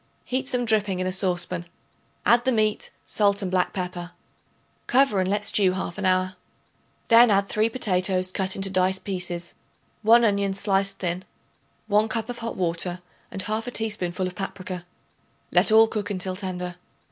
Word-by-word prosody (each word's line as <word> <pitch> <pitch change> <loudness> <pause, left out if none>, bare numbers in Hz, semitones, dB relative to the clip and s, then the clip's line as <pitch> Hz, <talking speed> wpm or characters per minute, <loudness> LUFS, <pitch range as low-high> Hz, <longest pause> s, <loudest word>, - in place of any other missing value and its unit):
Heat 260 +1 -2
some 250 -2 0
dripping 210 -4 +1
in 185 - -1
a 185 - -1
saucepan; 180 -2 -1 0.6
add 235 +4 +4
the 260 - +1
meat, 215 -3 0 0.2
salt 200 -1 +1
and 185 - -3
black 185 -1 +1
pepper; 180 -2 -5 0.7
cover 260 -6 +3
and 185 - -1
let 205 +1 0
stew 195 -3 +4
half 185 0 -5
an 195 - 0
hour. 185 0 +1 0.7
Then 235 +1 +7
add 200 -1 +3
3 215 +2 +1
potatoes 185 -5 0
cut 190 0 -1
into 195 0 0
dice 185 0 +2
pieces, 175 -3 -3 0.5
1 230 +2 +5
onion 200 -2 +1
sliced 195 0 +1
thin, 180 0 -3 0.6
1 210 +2 +2
cup 225 +1 -3
of 240 - -8
hot 230 0 -4
water, 175 0 0 0.3
and 190 - -3
1/2 220 +3 -2
teaspoonful 190 -5 -2
of 185 - -4
paprica. 185 -1 -6 0.7
Let - - +4
all 220 +1 +7
cook 210 -2 -4
until 185 -1 -1
tender. 180 -2 -5
195 Hz, 165 wpm, -24 LUFS, 185-215 Hz, 0.7 s, Then